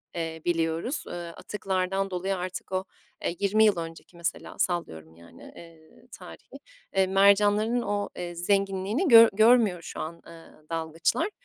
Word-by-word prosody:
eee, 165 -1 -4
biliyoruz. 165 - -1
Eee, - - -7
atıklardan 190 +2 -3
dolayı 190 +2 -2
artık 185 +1 -6
o, 185 0 -1 0.4
eee, 170 - -2
20 210 +2 +3
yıl 210 -4 +3
önceki 165 +1 -8
mesela 170 0 -4
sallıyorum 80 - -3
yani, 85 0 -15
eee, 165 -2 -16
tarihi. - - -12 0.4
Eee, 190 -1 +3
mercanların 205 +4 +3
o, 205 -2 -2
eee, 175 -1 -5
zenginliğini 195 - 0
gör 230 -4 +9
görmüyor 220 -4 +4
şu - - -8
an, 170 +2 -6
eee, 165 -1 -13 0.3
dalgıçlar, 165 - -1
185 Hz, 140 wpm, -26 LUFS, 165-205 Hz, 0.4 s, gör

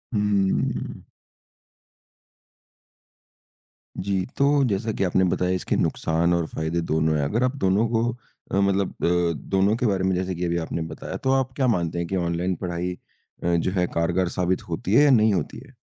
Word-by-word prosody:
उहुँ। 100 -2 0 3.0
जी, 95 -1 -1
तो 140 0 +3
जैसा 110 +1 -1
कि 100 - -2
आपने 95 +1 +2
बताया 90 +1 0
इसके 90 - -1
नुकसान 85 +2 +1
और 85 -1 +1
फ़ायदे 80 +2 -2
दोनों 80 -1 +1
हैं, 70 - 0
अगर 115 - 0
आप 130 +2 0
दोनों 100 +5 +3
को 115 -1 +1 0.5
अ, - - -1
मतलब 100 -1 +2 0.2
अ, 85 -1 +2 0.2
दोनों 100 +3 +3
के 125 - -1
बारे 95 -3 +1
में 95 -1 +1
जैसे 95 0 -2
कि 90 +1 -2
अभी 85 0 0
आपने 80 0 -3
बताया, 80 - -6
तो 130 - 0
आप 130 0 -2
क्या 130 -2 +1
मानते 85 -6 0
हैं 85 - -2
कि 95 - -2
ऑनलाइन 85 +1 -1
पढ़ाई 90 0 -2 0.5
अ, 85 0 +2
जो 85 +2 0
है 90 -2 +1
कारगर 85 +2 +1
साबित 90 +1 -1
होती 90 +4 -2
है 145 - +7
या 145 - +5
नहीं 110 -3 +4
होती 85 -6 -2
है? 135 - -18
95 Hz, 180 wpm, -24 LUFS, 85-105 Hz, 3.0 s, है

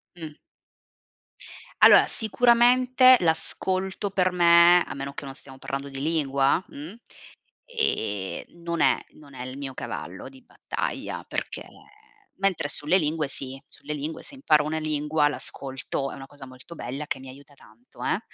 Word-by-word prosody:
Mh. 160 -3 -8 1.5
Allora, - - +8
sicuramente 250 +3 +4
l'ascolto 185 +4 -1
per 185 -1 +1
me, 175 0 +6
a - - -7
meno 140 0 -6
che 140 - -7
non 135 -1 -8
stiamo 135 -1 -13
parlando 135 +1 -5
di 135 -1 -7
lingua, 140 0 +1
mh, 155 +7 -9 0.7
ehm, 105 - -2 0.2
non 170 -2 -2
è - - +4
non 145 -2 -17
è 125 -1 -7
il 130 +1 -8
mio 140 -2 -6
cavallo 95 -9 -7
di 265 - -17
battaglia, - - -5
perché - - -5 0.7
mentre 190 -6 0
sulle 150 +5 +4
lingue 155 -3 -1
sì, 135 0 -1
sulle 150 +1 -8
lingue 150 +2 -6
se 285 - -8
imparo 155 - +2
una 160 +1 -2
lingua 150 0 0
l'ascolto, 135 -1 -2
è - - -8
una 135 - -10
cosa 145 -1 -13
molto 130 +5 -13
bella 135 +3 -6
che 140 - -4
mi 130 0 -11
aiuta 140 +2 -15
tanto 115 -2 -16
eh. - - 0
150 Hz, 155 wpm, -25 LUFS, 135-180 Hz, 1.5 s, Allora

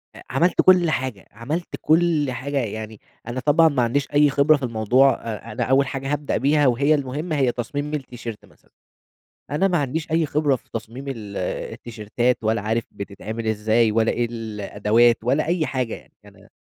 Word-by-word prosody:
أ - - -12
عملت 165 +8 +2
كل 180 -3 +5
حاجة 130 -8 -3
عملت 145 +11 -4
كل 155 -3 +2
حاجة، 140 +3 -4
يعني 110 -3 -4 0.3
أنا 120 +2 -3
طبعًا 150 +4 +4
ما 135 -5 +1
عنديش 135 +4 0
أي 145 0 +5
خبرة 145 +2 +4
في 140 - -10
الموضوع، 120 +3 +3
أ 115 0 -7
أنا 105 - -2
أول 135 +1 +3
حاجة 135 +1 -4
هابدأ 145 0 -1
بيها 145 +1 +3
وهي 140 +5 +3
المهمة 145 +4 -3
هي 130 -3 +2
تصميم 145 +5 -4
التيشيرت 120 -6 -6
مثلًا، - - -26 0.8
أنا 150 +7 +2
ما 175 -2 +1
عنديش 155 +3 -3
أي 160 0 +2
خبرة 145 -2 +1
في - - -22
تصميم 115 +4 -6
ال 105 -6 -6 0.4
التيشيرتات 120 +2 -2
ولا 110 0 +1
عارف 110 +2 -1
بتتعمل 110 +3 -6
إزاي 110 +1 +2
ولا 115 0 +2
إيه 120 0 0
الأدوات 110 +1 +1
ولا 135 +6 +1
أي 165 -1 0
حاجة 130 -4 -2
يعني، - - -14
أنا - - -18
130 Hz, 175 wpm, -22 LUFS, 115-145 Hz, 0.8 s, كل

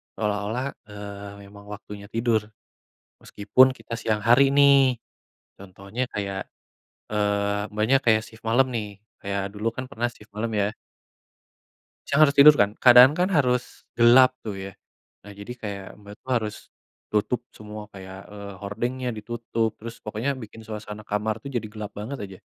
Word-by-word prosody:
seolah-olah, 105 +4 -2 0.2
eee, 100 -1 -8
memang 100 +1 -14
waktunya 105 0 -9
tidur. 115 -1 0 0.8
Meskipun 130 +6 +3
kita 115 -2 -7
siang 110 -2 -1
hari, 135 +5 +5
nih. 140 -2 +6 0.7
Contohnya 100 +6 -5
kayak, 100 -2 -4 0.6
eee, 105 0 0
Mbaknya 105 +6 +3
kayak 110 -2 +4
sif 110 0 -14
malam, 130 +3 +3
nih. 110 -3 -3 0.3
Kayak, 100 0 -3
dulu 105 +2 -4
kan 130 - -4
pernah 120 -3 -1
sif 115 -3 -13
malam, 110 +3 -3
ya. 100 0 +1 1.4
Siang 140 - +1
harus 140 -1 -1
tidur, 150 +1 +9
kan. 100 0 +2
Keadaan 125 +2 +9
kan 180 +4 +1
harus 125 -8 0
gelap 125 +2 +7
tuh, 105 -3 -5
ya. 95 0 -7 0.5
Nah, 105 - -11
jadi 100 +4 -8
kayak 100 -2 -5 0.2
Mbak 105 0 -11
tuh - - -11
harus 110 -3 -2 0.6
tutup 105 +3 0
semua, 105 0 -9
kayak, 95 0 -10
eee, 100 -1 -8
hordengnya 120 +6 -3
ditutup, 115 +1 -2
terus 115 +1 -8
pokoknya, 110 +6 -2
bikin 110 +1 -12
suasana 105 -1 -7
kamar 105 +1 -1
tuh, 140 - -6
jadi 115 -3 -2
gelap 105 -2 -6
banget, 120 +7 -5
aja. 95 -2 -9
110 Hz, 150 wpm, -25 LUFS, 100-125 Hz, 1.4 s, tidur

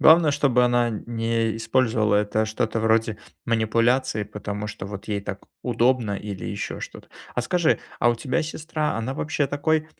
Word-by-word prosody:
Главное, 160 -2 +7
чтобы 125 -4 +3
она 120 -1 +3
не 115 0 -1
использовала 115 -3 +2
это 105 +1 +1
что-то 110 +1 -1
вроде 110 -1 +2 0.3
манипуляции, 115 0 +2
потому 105 0 -5
что, 105 - -6
вот, 100 -1 -7
ей 105 -2 -1
так 100 0 -6 0.2
удобно 120 -3 +2
или 100 -3 -6
еще - - -4
что-то. - - -9 0.3
А 125 - +1
скажи, 170 +1 +2 0.2
а 120 - +5
у 120 - 0
тебя 130 +7 0
сестра, 155 -3 -2
она 120 +4 -2
вообще 145 -2 0
такой 155 +3 +1
115 Hz, 160 wpm, -24 LUFS, 110-130 Hz, 0.3 s, Главное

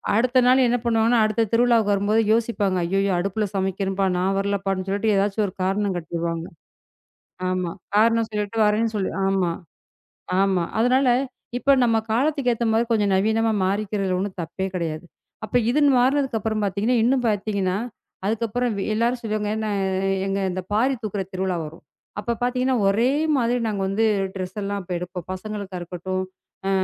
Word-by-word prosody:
அடுத்த 250 +3 +3
நாள் 255 +1 +5
என்ன 240 +1 +2
பண்ணுவாங்கன்னா, 230 0 +3
அடுத்த 215 +1 +1
திருவிழாவுக்கு 230 -3 +4
வரும்போது 205 +2 +2
யோசிப்பாங்க. 220 -4 0
ஐயய்யோ! 195 +3 +1
அடுப்புல 200 +4 -1
சமைக்கிறன்பா 195 0 -1
நான் 190 +2 +1
வரலப்பான்னு 195 -1 -1
சொல்லிட்டு 205 +2 +1
ஏதாச்சு 195 +2 0
ஒரு 185 - -8
காரணம் 195 +1 0
காட்டிருவாங்க. 165 0 -3 1.0
ஆமா. 185 -2 -1 0.2
காரணம் 225 +1 +4
சொல்லிட்டு 210 +1 -3
வரேன்னு 220 +2 +1
சொல்லி 195 -2 -1 0.2
ஆமா, 190 -3 +1 0.9
ஆமா. 190 -3 +2 0.2
அதனால 255 +3 +3 0.5
இப்ப 275 +2 +4
நம்ம 230 -2 +3 0.2
காலத்துக்கு 270 +1 +1
ஏத்தமாரி 225 0 +1
கொஞ்சம் 205 -3 +2
நவீனமா 220 +3 +2
மாறிக்கிறதுல 195 -1 -1
ஒன்னும் 195 -1 -4
தப்பே 175 +4 -4
கிடையாது. 165 -2 -3 0.4
அப்ப 215 - -2
இதுன்னு 290 +2 +4
மாறினதுக்கு 265 -1 +2
அப்புறம் 215 0 -1
பாத்தீங்கன்னா, 205 +6 0
இன்னும் 250 0 +2
பாத்தீங்கன்னா, 200 -3 0 0.5
அதுக்கப்புறம் 230 +3 -1
வ் 195 - -2
எல்லாரும் 235 +3 0
சொல்லுவாங்க, 215 -2 -2
நா - - -2 0.6
ஏங்க 195 0 -1
இந்த 185 +1 -3
பாரி 250 +6 +2
தூக்குற 205 -2 -2
திருவிழா 185 -1 -1
வரும். 155 +2 -11 0.4
அப்ப 235 +2 -2
பாத்தீங்கன்னா, 250 +1 +1
ஒரே 225 +6 +3 0.3
மாதிரி 240 0 +1
நாங்க 205 -2 -2
வந்து 205 +4 +1 0.3
ட்ரெஸ் 185 +1 -5
எல்லாம் 200 0 -2
இப்ப 180 - -4
எடுப்போம். 180 -1 -7
பசங்களுக்கு 200 -1 -6
இருக்கட்டும், 185 +2 -4 0.4
ஆ, - - +1
210 Hz, 150 wpm, -23 LUFS, 190-230 Hz, 1.0 s, நாள்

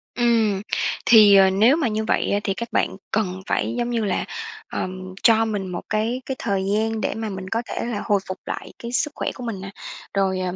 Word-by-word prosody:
Ừm, 225 -4 +2 0.4
thì, 215 -3 +8
ờ, 190 -1 +7
nếu 220 +8 +5
mà 295 -7 +1
như 215 0 -1
vậy - - +1
á, 205 - +2
thì 195 - 0
các 235 +4 -5
bạn 205 - 0
cần 190 -3 -1
phải - - 0
giống 240 0 -1
như 230 -3 0
là, 200 - -1 0.4
ờm, 185 0 -5
cho 225 -1 +5
mình 205 -3 -2
một 180 -1 -4
cái 225 +4 0
cái 265 - -3
thời 195 -3 -1
gian 220 +1 0
để - - -1
mà 220 -1 -3
mình 190 -1 -6
có 230 - 0
thể - - -4
là 230 -4 -3
hồi 205 -1 +3
phục 185 0 -4
lại - - -6
cái 235 - -6
sức 295 +4 +1
khỏe - - -2
của 250 - -9
mình 220 -5 -4
nè. 195 - -6 0.4
Rồi, 190 -1 +1
ờm, 185 -1 -2
215 Hz, 235 wpm, -23 LUFS, 190-230 Hz, 0.4 s, thì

